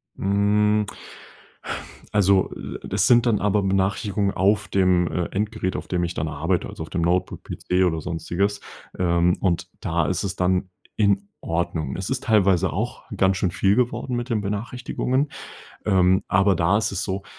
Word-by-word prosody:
Hm. 105 +1 +2 1.3
Also, 100 -2 +3
äh, - - -7
das 100 +1 +2
sind 120 -1 +5
dann 115 -4 +2
aber 105 0 +2
Benachrichtigungen 100 +1 0
auf 100 +2 +2
dem, 90 -2 +3
äh, 90 - -1
Endgerät, 95 -2 -2
auf - - -5
dem 90 -1 -1
ich 85 0 -2
dann 80 - -2
arbeite, 80 +4 -1
also - - -7
auf 80 - -10
dem 90 - -2
Notebook, 90 +2 0
PC 90 +1 -1
oder 80 -3 +1
sonstiges. 90 +5 -2 0.4
Ähm, 85 -1 +2
und 85 -3 0
da 85 -1 0
ist 90 +3 -1
es 95 0 -3
dann 90 0 +1 0.3
in 100 -1 +1
Ordnung. 80 -4 -2
Es 95 0 -4
ist 130 -1 -2
teilweise 95 -5 +3
auch - - -3
ganz 95 0 +2
schön 90 - 0
viel 95 +3 +2
geworden 125 +1 0
mit 120 +2 -3
den 110 -3 0
Benachrichtigungen. 125 +6 -2 0.6
Ähm, 95 -1 +3
aber 95 +1 +4
da 85 +4 +2
ist 110 -1 -1
es 100 - -2
so 95 0 -3
95 Hz, 170 wpm, -23 LUFS, 90-105 Hz, 1.3 s, sind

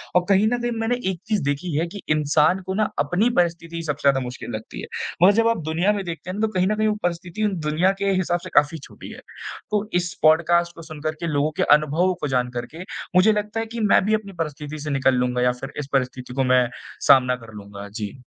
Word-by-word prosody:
और 180 0 +4
कहीं 200 +2 +4
न 240 +1 0
कहीं 240 - -1
मैंने 225 +2 +1 0.2
एक 175 - -7
चीज़ 215 -2 +1
देखी 145 +4 -2
है 165 +2 0
कि 200 +3 -9
इंसान 155 +4 +3
को 190 - -3
ना 215 0 +1
अपनी 205 +7 +2
परिस्थिति 170 -1 -3
सबसे 150 -2 -3
ज़्यादा 135 - +2
मुश्किल 125 0 -7
लगती 110 - -8
है। - - -7 0.4
मगर 195 - +8
जब 230 - +2
आप 230 - +2
दुनिया 165 +6 +1
में 200 -2 -3
देखते 170 +1 -6
हैं 190 +3 -4
तो 220 - +3
कहीं 185 -3 0
न 215 - +1
कहीं 215 0 +1
वो 210 - +1
परिस्थिति 175 +4 -1 0.2
दुनिया 170 +5 +3
के 200 0 +1
हिसाब 175 -1 0
से - - -7
काफ़ी 145 +2 +3
छोटी - - -11
है। - - -10 0.5
तो 210 0 0
इस 175 0 0
पॉडकास्ट 170 +2 +3
को - - -10
सुनकर 155 -1 -4
के 170 - -3
लोगों 150 0 +1
के - - +2
अनुभवों 155 +5 0
को 150 - -1
जानकर 125 -2 -1 0.2
के 170 - -7 0.3
मुझे 185 +4 +6
लगता 210 +1 -2
है 225 - -1
कि 230 +1 -7
मैं 210 -2 +4
भी 215 - +1
अपनी 210 -2 -2
परिस्थिति 150 -1 -4
से 150 +1 -5
निकल 135 -2 +2
लूँगा 125 0 0
या 125 0 +4
फिर 135 - -6
इस 140 - -4
परिस्थिति 125 -1 -1
को 135 +1 +1
मैं, 125 -1 +3 0.4
सामना 125 -2 +6
कर 115 -2 -13
लूँगा। 100 -1 -9
जी। 105 +3 -6
165 Hz, 240 wpm, -23 LUFS, 140-195 Hz, 0.5 s, मगर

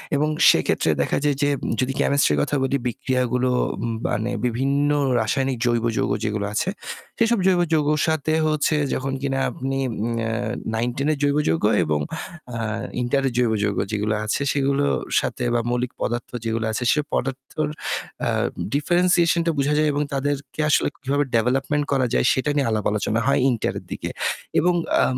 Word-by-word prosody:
এবং 150 +2 +2 0.2
সেক্ষেত্রে - - +2
দেখা - - 0
যায় 145 -1 +2
যে 145 - +3 0.3
যদি 130 +1 0
কেমিস্ট্রির 140 - +3
কথা 145 - 0
বলি 135 +1 +1
বিক্রিয়াগুলো 125 +1 0 0.6
মানে 110 +4 -1
বিভিন্ন 135 +4 +1 0.3
রাসায়নিক 130 +3 0
জৈব 120 -1 +1
যৌগ - - 0
যেগুলো 105 -1 -1
আছে, 175 - 0 0.5
সেসব 230 -1 +2
জৈব 185 -2 +4
যৌগের 150 -1 +2
সাথে 155 -1 0
হচ্ছে 155 0 +1 0.2
যখন 135 +1 -2
কিনা 135 -1 -1
আপনি 135 -4 -3
আম - - -4 0.4
আ - - -1 0.4
9-10 120 +5 -1
এর 155 - -1
জৈব 145 0 +2
যৌগ 80 - 0 0.2
এবং 75 -1 0 0.6
আ - - -3 0.4
ইন্টারের 135 +2 +1
জৈব 120 -2 +3
যৌগ 100 -1 0
যেগুলো 105 0 0
আছে 110 - -1
সেগুলোর 140 0 +1 0.2
সাথে 125 - -3 0.3
মৌলিক 125 +1 -1
পদার্থ 120 0 -2 0.2
যেগুলো 115 0 -1
আছে 110 +3 -2
সে - - +2
পদার্থর 135 +3 -2 0.6
আ - - +1 0.4
ডিফারেনশিয়েশন 175 +3 +3
টা 165 - +2
বুঝা 140 +2 +2
যায় 155 0 +3
এবং 145 +1 0
তাদেরকে 140 +2 -3
আসলে - - +3
কীভাবে 140 +2 +1
ডেভেলপমেন্ট 135 +5 +1
করা 135 -2 +2
যায় - - +2
সেটা 130 +3 -1
নিয়ে 140 -4 +2
আলাপ 110 -2 -1
আলোচনা 105 +2 0
হয় 140 - +3
ইন্টার 120 -3 -1
এর - - -17
দিকে। - - -4 0.5
এবং 180 +2 +3 0.3
আ - - +5
135 Hz, 160 wpm, -23 LUFS, 120-145 Hz, 0.6 s, আ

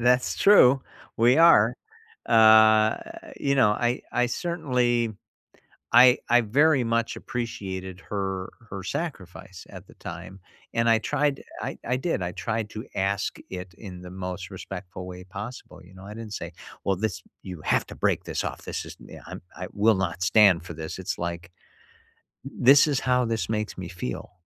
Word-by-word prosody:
That's 125 +1 +2
true. 135 -10 +6 0.4
We 120 +4 +4
are. 170 +1 +6 0.5
Uh, 110 -1 +6 0.4
you 140 -1 +1
know, 130 -6 +4
I 120 +4 0
I 125 0 +2
certainly 120 -6 0 0.8
I 125 0 +7
I 120 +1 +6
very 135 +4 +3
much 115 0 -1
appreciated 95 -6 -5
her 95 -2 -4 0.2
her 95 -1 -6
sacrifice 95 - -6
at - - -11
the - - -17
time, 90 +3 -9 0.3
and 115 0 +2
I 115 -1 +5
tried 140 +5 -1 0.2
I - - -5
I 125 - +1
did. 130 - -2
I 90 0 -3
tried 105 +2 -3
to 110 - -7
ask 100 +1 -1
it 90 -1 -7
in 90 -4 -9
the 90 - -10
most 90 0 -6
respectful 95 -1 -8
way 90 0 -9
possible, 105 +7 -9
you 90 +2 -17
know? 95 +1 -13
I 105 +1 -9
didn't 110 -1 -8
say, - - -6 0.3
"Well, 95 - +1
this 105 0 -3 0.2
you 90 -4 -8
have - - +1
to - - -9
break - - 0
this - - -3
off. - - -5
This - - -5
is, - - -10
yeah, - - -12
I - - -10
I'm - - -8
I 90 - -5
will 110 +2 +3
not 90 -2 -3
stand 95 -2 +5
for 85 -2 -8
this." 80 +3 -6
It's 95 - -4
like, 85 0 -5 0.9
"This 135 +1 +5
is 140 -3 +1
how 125 -1 +1
this 115 -1 -2
makes 105 -1 -3
me 90 -2 -6
feel," 75 -9 -6
105 Hz, 175 wpm, -25 LUFS, 95-120 Hz, 0.9 s, I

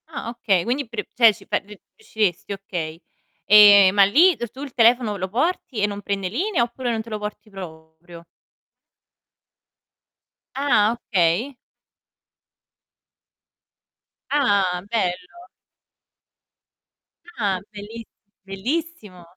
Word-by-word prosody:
Ah 315 -7 -7
okay, 215 -7 0
quindi 255 +5 -2
pre 235 - -6
cioè 230 -3 +5
ci - - -17
fa 210 - 0
r - - -10 0.3
riusciresti, 210 - -2
okay. 175 -5 -6 0.4
Ehm, 205 -2 +7
ma 200 -1 +5
lì 330 - +4
tu 240 +3 -7
il 280 -3 -8
telefono, 235 -3 +3
lo 190 0 -3
porti 260 - -2
e 205 - +2
non 205 0 -6
prende 195 -1 -3
linea, 335 - 0
oppure 240 +1 -4
non 225 -1 -2
te 225 - -12
lo 215 -1 -4
porti 210 +1 -8
proprio? 170 -2 -12 2.3
Ah, 235 -6 +2
okay. 215 +3 -1 2.7
Ah, 200 -11 +1
bello. 235 - -3 1.9
Ah, 200 -5 -1
bellis 215 +2 -9 0.4
bellissimo. 210 - -5
210 Hz, 110 wpm, -22 LUFS, 195-245 Hz, 2.7 s, Ehm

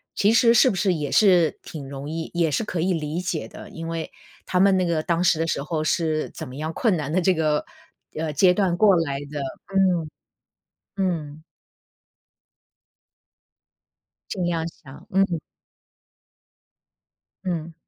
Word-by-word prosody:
其 205 +2 +3
实 230 0 +5
是 255 - +6
不 195 - -2
是 190 -1 +2
也 150 -4 -3
是 180 -7 +4
挺 140 -4 -8
容 140 +1 -6
易 160 0 -4
也 170 -2 +2
是 145 - 0
可 185 -5 -4
以 180 +3 +1
理 155 0 -2
解 180 -3 -3
的， - - -11
因 165 0 -7
为 165 -1 -4 0.4
他 180 0 +1
们 195 -1 +5
那 185 - +1
个 165 -2 0
当 170 0 0
时 175 -3 +3
的 165 - +1
时 150 - -1
候 155 +1 -2
是 155 -1 0
怎 - - -8
么 130 - -9
样 155 +2 -3
困 210 +1 +1
难 150 -2 -3
的 185 - +2
这 185 +1 +3
个， 155 -2 0 0.5
呃， 155 -1 -2
阶 180 +5 +4
段 180 -3 +1
过 200 -2 +6
来 140 -5 0
的。 145 -1 -4 0.3
嗯， 180 -5 +2 0.9
嗯。 160 -6 -2 2.9
尽 185 -3 -2
量 165 -2 -1
想， 145 -1 -14
嗯。 190 -4 +2 2.1
嗯。 170 -3 -3
165 Hz, 170 characters per minute, -24 LUFS, 155-185 Hz, 2.9 s, 是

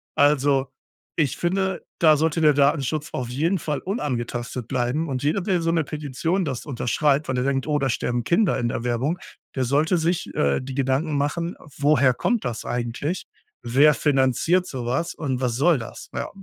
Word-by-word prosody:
Also, 140 -2 +3 0.5
ich 140 -5 +1
finde, 190 +2 -1 0.2
da 155 -2 +6
sollte 160 +2 +1
der 150 -2 +5
Datenschutz 145 +1 +1
auf 125 -2 -3
jeden 165 +8 0
Fall 150 -1 -2
unangetastet 125 - -3
bleiben 135 +5 -1
und 130 -1 -2
jeder, 160 +7 +1
der 180 -2 0
so 165 0 +1
'ne 165 -2 +2
Petition 155 +5 -2
das 130 -4 -4
unterschreibt, 145 +2 +1
weil 130 -1 -1
er 125 - +1
denkt: 135 +1 0
„Oh, 150 -1 +2
da 135 -1 0
sterben 120 0 -1
Kinder 175 - +2
in 120 -1 0
der 115 - -3
Werbung“, 130 +9 0 0.4
der 130 -1 0
sollte 150 +7 +2
sich, 165 +1 -1
äh, 70 - +1
die 130 0 -7
Gedanken 140 +3 0
machen: 170 +5 -1 0.2
„Woher 140 -3 +4
kommt 240 - 0
das 120 -2 -3
eigentlich? 120 +8 -3 0.4
Wer 140 +6 +5
finanziert 145 +6 +2
so 125 -7 -5
was? 130 +8 -1
Und, 135 -4 -3
was 120 -3 0
soll 155 +3 +4
das?“ 115 - -9
Ja. 140 - -3
145 Hz, 185 wpm, -23 LUFS, 130-165 Hz, 0.5 s, da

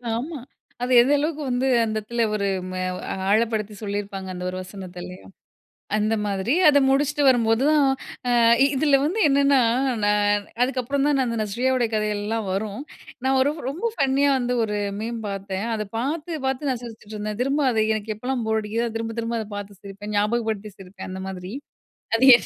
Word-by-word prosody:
ஆமா. 285 +6 -4 0.4
அது 250 +1 -1
எந்த 265 +4 +3
அளவுக்கு 305 +1 -2
வந்து 250 +2 0 0.2
அந்த 215 - -3
இடத்துல 235 +2 -1
ஒரு 200 -1 0 0.2
ம - - -6 0.6
ஆழப்படுத்தி 215 -1 +1
சொல்லிருப்பாங்க 200 -2 -4
அந்த 180 0 -6
ஒரு 185 - -6
வசனத்த. 185 -1 -9
இல்லயா? 180 +1 -10 0.7
அந்த 215 +1 +1
மாதிரி. 200 +5 0
அத 285 -1 +6
முடிச்சுட்டு 290 +2 +2
வரும்போதும். 250 +4 +4 0.5
அ - - +2 0.3
இ - - +6
இதுல 280 0 +4
வந்து 370 +8 -1
என்னென்னா, 275 -1 +4 0.4
நான் 205 0 +2 0.2
அதுக்கப்புறம் 270 +2 0
தான் 295 - +3
நான் 265 - +2
அந்த 230 -1 -2
நஸ்ரியாவோட 245 +4 +1
கதையெல்லாம் 215 +1 -1
வரும். 210 +4 -3 0.4
நான் 265 0 +3
ஒரு 285 +3 +2 0.2
ரொம்ப 360 +12 -2
ஃபன்னியா 275 0 +2
வந்து 245 0 -1
ஒரு 210 -1 -2 0.2
மீம் 230 +1 -4
பார்த்தேன். 195 +1 -4
அத 215 -1 -3
பார்த்து 310 +5 -3
பார்த்து 270 +2 -1
நான் 250 -2 -3
சிரிச்சிட்டுருந்தேன். 215 -2 -6
திரும்ப 275 +3 +1
அதை 220 -2 +2
எனக்கு 215 0 -3
எப்போலாம் 250 0 -2
போர் 220 0 +1
அடிக்குதோ 225 +3 -1
அது 225 0 -4
திரும்ப 225 0 -4
திரும்ப 230 0 -2
அதை 215 - -8
பார்த்து 200 -1 -9
சிரிப்பேன். 200 +1 -7
ஞாபகப்படுத்தி 215 -1 -1
சிரிப்பேன், 190 0 -10
அந்த 190 - -6
மாதிரி. 185 0 -6 0.6
அது 230 +3 +3
என் - - +3
225 Hz, 170 wpm, -23 LUFS, 205-265 Hz, 0.7 s, அத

